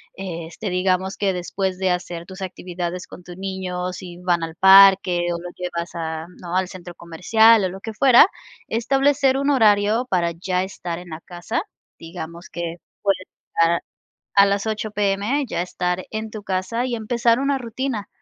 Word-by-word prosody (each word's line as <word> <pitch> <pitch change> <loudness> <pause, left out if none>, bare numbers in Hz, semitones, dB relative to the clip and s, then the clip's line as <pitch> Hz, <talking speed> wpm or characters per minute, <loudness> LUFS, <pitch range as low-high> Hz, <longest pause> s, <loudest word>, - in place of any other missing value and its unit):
este, 170 +1 -6
digamos 185 +1 0
que 200 -1 +1
después 185 +1 -2
de 190 -1 +1
hacer 175 -1 -3
tus 190 +1 -11
actividades 180 -1 -5
con 180 - -13
tu 175 0 -10
niño, 185 -1 -4
si 175 -1 -9
van 175 -1 0
al 165 0 -5
parque 190 -2 +7
o - - -2
lo 175 +1 -7
llevas 170 -1 -4
a, 160 -1 -4 0.2
¿no?, 175 0 -5
al 185 0 +1
centro 175 -2 -10
comercial 210 +6 +4
o - - 0
lo 190 +2 -9
que 225 - -6
fuera, 255 +3 +7 0.4
establecer 270 +3 +2
un 280 +1 0
horario 220 -1 +3
para 175 -2 +1
ya 180 +2 -1
estar 180 -3 -5
en 180 0 -12
la 160 0 -7
casa. 175 - -4 0.4
Digamos 170 0 -8
que 170 0 -5 0.3
puedes 195 -2 0 0.3
estar 165 +1 +4 0.5
a 200 0 +8
las 200 +1 0
8:00 215 0 -3
PM, 205 +7 0
ya 200 - -2
estar 180 0 -2
en 220 0 -4
tu 215 - -7
casa 195 +6 -1
y 250 -2 -2
empezar 235 +1 +1
una 275 0 +1
rutina, 235 -3 -4
190 Hz, 175 wpm, -22 LUFS, 175-215 Hz, 0.5 s, a